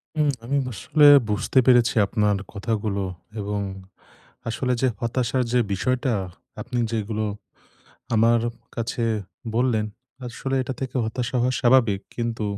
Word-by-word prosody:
উম 150 -1 +2
আমি 140 +4 0
আসলে 145 - +2 0.2
বুঝতে 105 +5 -1
পেরেছি 120 -2 +5
আপনার 105 0 +1 0.2
কথাগুলো 100 -1 -2 0.4
এবং 100 0 -2 0.9
আসলে 125 +2 -1
যে 130 - +4
হতাশার 125 +2 0
যে 125 - +4
বিষয়টা 125 +5 0 0.5
আপনি 125 +3 -4
যেগুলো 110 -1 -2 0.9
আমার 115 +1 +4 0.4
কাছে 115 0 -2 0.5
বললেন, 115 -3 +1 0.4
আসলে 135 +2 -4
এটা 130 - -4
থেকে 130 0 -4
হতাশা 120 +3 -2
হওয়া 125 +1 +2
স্বাভাবিক। 120 -6 +4 0.2
কিন্তু 115 -2 -2
120 Hz, 120 wpm, -24 LUFS, 110-130 Hz, 0.9 s, পেরেছি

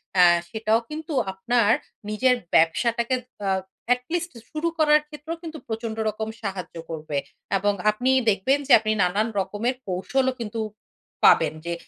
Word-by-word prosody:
এ্যা 180 -1 +7 0.2
সেটাও 220 +1 +1
কিন্তু 310 +1 -6 0.2
আপনার 215 +3 +2 0.4
নিজের 250 +4 +3 0.2
ব্যবসাটাকে 235 +9 +3 0.3
আ - - +2 0.4
at 250 - -5
least 345 0 -1 0.2
শুরু 315 +2 -2
করার 300 -1 +5
ক্ষেত্রেও 315 +2 -6
কিন্তু 320 -1 -6
প্রচন্ড 225 0 -4
রকম 215 +1 -4
সাহায্য 190 -5 -5
করবে। 155 -3 -4 0.4
এবং 205 +1 +1 0.2
আপনি 245 +5 -1 0.2
দেখবেন 220 +8 +2
যে - - -1
আপনি 215 0 -1
নানান 200 +5 +1
রকমের 205 +7 -1
কৌশলও 255 +9 0
কিন্তু 225 0 -4 0.7
পাবেন, - - +5
যে 170 - -2
225 Hz, 140 wpm, -24 LUFS, 195-265 Hz, 0.7 s, এ্যা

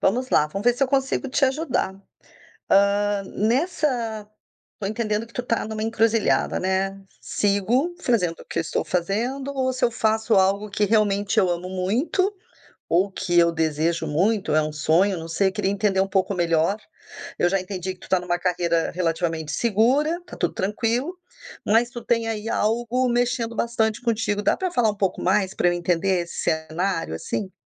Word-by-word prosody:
vamos 250 +6 +1
lá, 150 - +4
vamos 195 +8 -6
ver 245 - +5
se 260 - -2
eu 270 - +3
consigo 270 0 0
te 275 +2 +2
ajudar. 265 -7 -1 0.8
Hã, 200 0 +3
nessa 230 - -1 0.5
tô 200 - -3
entendendo 215 +1 -2
que 230 - -20
tu 245 - -2
tá 230 -3 -1
numa 215 0 -4
encruzilhada, 225 0 +1
né, 190 +1 -1 0.2
"sigo 220 - 0
fazendo 190 - 0
o - - -12
que - - -4
eu - - +3
estou 160 - -2
fazendo 235 +10 -2
ou 260 -1 0
se 255 - 0
eu 240 - +3
faço 220 0 +1
algo 200 +2 +2
que 210 +1 +1
realmente 205 0 +1
eu 190 -4 +4
amo 175 +1 -3
muito, 235 - 0 0.6
ou 185 +4 +3
que 185 -2 -1
eu 170 0 +4
desejo 160 +1 0
muito, 190 +5 +1
é 155 - +4
um 155 0 -2
sonho", 170 +6 +2
não 165 0 -7
sei, 165 +4 +1
eu - - -8
queria 195 -2 0
entender 200 -1 +1
um 195 - 0
pouco 195 0 0
melhor, 170 +3 +1 0.6
eu 175 - +3
já 195 +1 +1
entendi 185 0 -5
que 180 - -30
tu - - -13
tá 185 - +3
numa 175 0 -1
carreira 170 -2 0
relativamente 165 -2 -1
segura, 260 - +2
tá - - -10
tudo - - -1
tranquilo, 235 - -1 0.5
mas 230 +3 +3
tu 240 -1 -8
tem 230 -1 +1
aí 220 -1 -3
algo 240 +4 0
mexendo 240 -1 0
bastante 225 -1 0
contigo, 225 -3 0
dá - - +3
pra 375 - -1
falar 245 -9 +2
um - - -10
pouco 195 -2 -1
mais, 190 +1 +2
pra - - +2
eu - - 0
entender 175 +2 +1
esse 170 - -8
cenário, 160 - -1
assim? 190 - -4
205 Hz, 185 wpm, -23 LUFS, 180-235 Hz, 0.8 s, ver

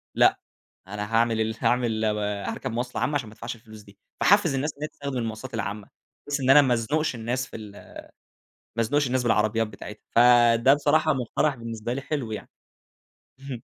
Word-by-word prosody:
لأ، - - +4 0.5
أنا 105 +2 -5
هاعمل 115 -1 +2
ال 110 0 -1
هاعمل 115 -3 +1
هاركب 105 -1 -2
مواصلة 120 +2 -3
عامة 145 - 0
عشان 120 -7 -2
ما - - -14
ادفعش 115 +1 -6
الفلوس 110 -2 -14
دي. 100 -1 -18 0.2
فاحفز 200 -6 +4
الناس 145 +3 -1
إن 145 - -16
هي 150 - -1
تستخدم 140 -2 -5
المواصلات 115 +2 -5
العامة، 105 -2 -4 0.4
بحيث 145 0 -1
إن 130 - 0
أنا 145 +2 +9
ما 130 -3 +2
ازنُقش 140 +6 0
الناس 125 +3 -2
في - - -12
ال 105 -2 -9 1.1
ما 115 - +2
ازنُقش 145 +5 +1
الناس 130 0 0
بالعربيات 110 -1 +2
بتاعتها، 105 0 -10
فده 120 +2 +6
بصراحة 155 +2 +2
مُقترَح 135 +3 0
بالنسبة 115 0 -5
لي 135 - -3
حلو 135 -5 -4
يعني. 105 -2 -7 0.9
اهم. 135 -4 -7
120 Hz, 180 wpm, -25 LUFS, 110-135 Hz, 1.1 s, أنا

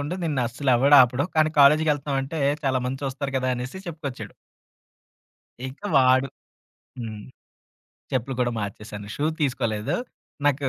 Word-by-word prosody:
ఉండు, 150 +5 -3
నిన్నస్సలు 130 -2 -1
ఎవడు 140 +4 +6
ఆపడు. 125 +4 +1
కానీ 155 0 +4
కాలేజీకెళ్తన్నాం 145 -1 +4
అంటే, 150 +4 -5 0.2
చాలా 130 -1 +2
మంది 130 +1 -4
చూస్తారు 135 +1 -3
గదా!" 130 0 -1
అనేసి 125 +8 -6
చెప్పుకొచ్చాడు. 150 -6 -6 1.4
ఇక 130 - -12 0.2
వాడు 130 +1 +4 0.7
హ్మ్. 110 -3 -6 0.9
చెప్పులు 130 +1 -1
కూడా 120 -1 +1
మార్చేేశాను. 105 0 -7
షూ 145 - -1 0.2
తీసుకోలేదు. 115 -6 -1 0.5
నాకు 140 -1 +2
135 Hz, 125 wpm, -24 LUFS, 125-145 Hz, 1.4 s, ఎవడు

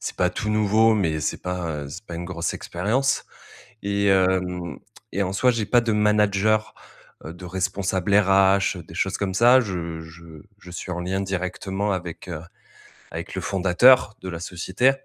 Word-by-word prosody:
c'est - - -5
pas - - +2
tout 105 - -4
nouveau, 110 +1 +3
mais 80 -7 0
c'est 75 - -2
pas, 85 -5 -3
heu, - - -8
c'est 90 +9 -9
pas 85 - -8
une 85 +1 -5
grosse 85 -2 -3
expérience 110 +10 -1 0.6
et 100 0 -1
hem 90 -2 +1 0.3
et 100 - 0
en 95 - -3
soi, 125 +6 +3
j'ai 115 -3 0
pas 120 +2 +4
de 115 -2 -1
manager, 105 0 +2 0.5
heu, 80 - -7
de 90 +1 -11
responsable 95 +1 -1
RH, 95 -1 +4
heu, 85 - -8
des 80 - -14
choses 95 +2 -1
comme 95 -2 -2
ça. 120 +6 +6
Je 85 -8 -4
je 80 -1 -13 0.2
je 90 - -12
suis 90 +1 -6
en 90 - -3
lien 95 +2 -2
directement 95 +1 -2
avec, 90 -2 -5
heu, 80 -2 -5 0.7
avec - - -7
le - - -3
fondateur 100 +5 +4
de 95 - -7
la 85 - -5
société 95 +9 +1
95 Hz, 185 wpm, -23 LUFS, 90-105 Hz, 0.7 s, ça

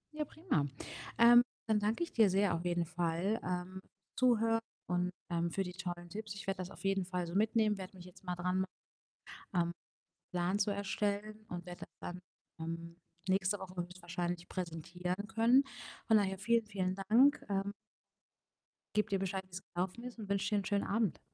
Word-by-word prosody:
Ja, 300 -1 -1
prima. 285 - 0 0.5
Ähm, 240 +1 +9 0.3
dann 215 -1 +4
danke 215 +10 +1
ich 335 - -5
dir 220 -4 +6
sehr 195 -1 +3
auf 165 +1 -1
jeden 175 -1 +1
Fall, 175 +5 0
ähm, 180 +1 -3 0.4
Zuhören 230 -3 +4 0.3
und, 180 0 +1 0.2
ähm, 170 0 +1
für 195 +3 0
die 180 -1 -6
tollen 175 -2 -5
Tipps. 210 +1 -5
Ich 200 - -7
werde 195 -1 -1
das 185 0 -3
auf - - -11
jeden 195 -1 +2
Fall 180 -1 -2
so 170 - -6
mitnehmen, 215 0 +3
werde 185 0 -7
mich 175 - -10
jetzt 180 +1 -14
mal 180 -1 -2
dran 180 +1 0
machen, 190 - +1 0.9
ähm, 170 -1 +2 0.6
Plan 180 +3 +1
zu 205 - +3
erstellen 205 +1 -1
und 175 0 -5
werde 175 -1 -8
das - - -7
dann, 180 +1 -5 0.4
ähm, 165 +1 -5 0.3
nächste 190 +1 +2
Woche 185 -1 -8
höchstwahrscheinlich 175 0 -4
präsentieren 180 +2 -3
können. 230 +5 +5 0.4
Von 220 - +6
daher 190 -2 +2
vielen, 230 +2 +3
vielen 185 -2 0 0.2
Dank, 275 +6 +6
ähm 200 0 0 1.2
gebe 210 - +3
dir 195 - +2
Bescheid, 190 0 -2
wie 185 - -27
es - - -9
gelaufen 185 +6 -2
ist 245 -2 -7
und 205 -2 -6
wünsche 200 -1 +1
dir 205 - +4
'n - - -9
schönen 200 -1 +1
Abend. 215 -3 +1
190 Hz, 185 wpm, -35 LUFS, 180-210 Hz, 1.2 s, Ähm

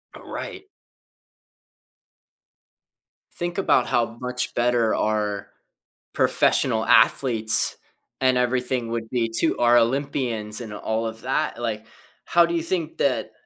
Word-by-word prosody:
Oh, - - -12
right. 380 0 -7 2.7
Think 175 0 -4
about 195 - +2
how 115 -1 0
much 125 0 -3
better 120 -2 +2
our 105 -2 -1 0.7
professional - - +1
athletes 110 -5 +4 0.4
and 130 -1 +2
everything 125 -1 -1
would 115 -1 -4
be 115 -2 -1
too 115 - 0
our 120 0 +5
Olympians, 120 -4 -1
and 115 -4 -7
all 110 +2 -2
of 110 0 -8
that, 135 -1 -2
like, 110 -2 -3 0.4
how 170 0 +4
do 170 - -3
you 170 - 0
think 165 -2 -3
that, 135 -3 0
120 Hz, 120 wpm, -23 LUFS, 115-130 Hz, 2.7 s, our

